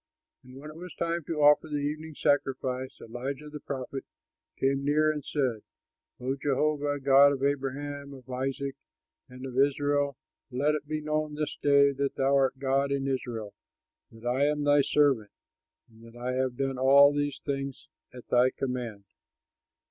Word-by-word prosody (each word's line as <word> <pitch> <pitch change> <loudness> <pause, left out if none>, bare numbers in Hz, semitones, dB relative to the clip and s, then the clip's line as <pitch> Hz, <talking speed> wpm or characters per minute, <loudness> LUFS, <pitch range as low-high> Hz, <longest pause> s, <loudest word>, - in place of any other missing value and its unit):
When 130 +3 -11
it 155 - -13
was 180 +1 -9
time 170 0 -2
to 155 -3 -1
offer 150 +2 +6
the 150 -1 -2
evening 150 +2 -4
sacrifice, 130 -3 -1
Elijah 130 +6 -6
the 150 - -7
prophet 135 -1 -5 0.5
came 135 +1 +1
near 155 +2 +3
and 150 -2 -5
said, 130 -7 -1 0.6
"O 130 +2 -2
Jehovah, 145 +1 0
God 140 +1 +6
of 135 -1 -4
Abraham, 140 +1 -2
of 130 -1 -15
Isaac, 135 +2 -3 0.6
and 125 +1 -9
of 130 0 -3
Israel, 145 0 +2 0.3
let 140 +4 +1
it 150 -1 -4
be 155 0 -2
known 155 0 -2
this 150 0 -3
day 140 -1 +4
that 140 0 -2
thou 135 +1 +2
art 135 -1 +2
God 135 +1 +1
in 135 -1 -1
Israel, 120 -6 -3 0.6
that 115 +1 -14
I 130 +3 +2
am 150 0 0
thy 145 0 +5
servant, 135 -8 +2 0.6
and 110 0 -20
that 115 0 -14
I 125 +1 -2
have 130 -1 -1
done 135 -1 -2
all 140 +2 +7
these 145 -1 -1
things 135 -2 -4 0.2
at 125 -1 -12
thy 125 +1 +5
command. 125 -6 -4
140 Hz, 165 wpm, -28 LUFS, 130-145 Hz, 0.6 s, all